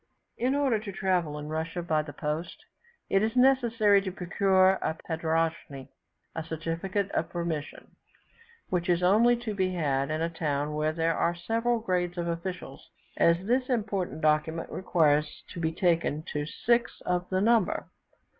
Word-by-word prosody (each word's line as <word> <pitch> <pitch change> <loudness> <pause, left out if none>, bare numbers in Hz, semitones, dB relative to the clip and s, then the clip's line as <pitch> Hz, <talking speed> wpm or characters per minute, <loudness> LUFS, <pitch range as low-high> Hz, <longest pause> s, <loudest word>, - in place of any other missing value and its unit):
In 255 +3 0
order 270 -6 +2
to 205 -1 -7
travel 180 -6 0
in 150 0 -6
Russia 160 +3 -3
by 155 -2 +1
the 150 -1 -8
post, 150 +4 -4 0.4
it 195 - +2
is 220 +2 0
necessary 235 -6 +4
to 190 -1 -4
procure 190 +1 +2
a 160 - -1
padroschne 160 -4 -2 0.5
(certificate 165 +5 -3
of 165 - -1
permission), 170 -4 -4 0.8
which 180 0 -1
is 175 0 +2
only 230 +6 +5
to 235 -2 -4
be 185 -2 -1
had 140 -4 0
in 155 +1 -1
a - - +1
town 150 -3 -2
where 155 +1 0
there 165 0 0
are 170 - +1
several 230 +7 0
grades 180 -4 -1
of 170 0 -2
officials, 170 -4 -5 0.3
as 170 +2 +3
this 250 +4 +1
important 205 -9 -1
document 155 +2 +1
requires 155 -5 +1
to - - -8
be 160 -1 0
taken 165 -3 +1
to 150 0 -2
six 235 +7 0
of 180 0 -1
the 185 - +1
number. 225 0 +2
175 Hz, 155 wpm, -28 LUFS, 160-200 Hz, 0.8 s, only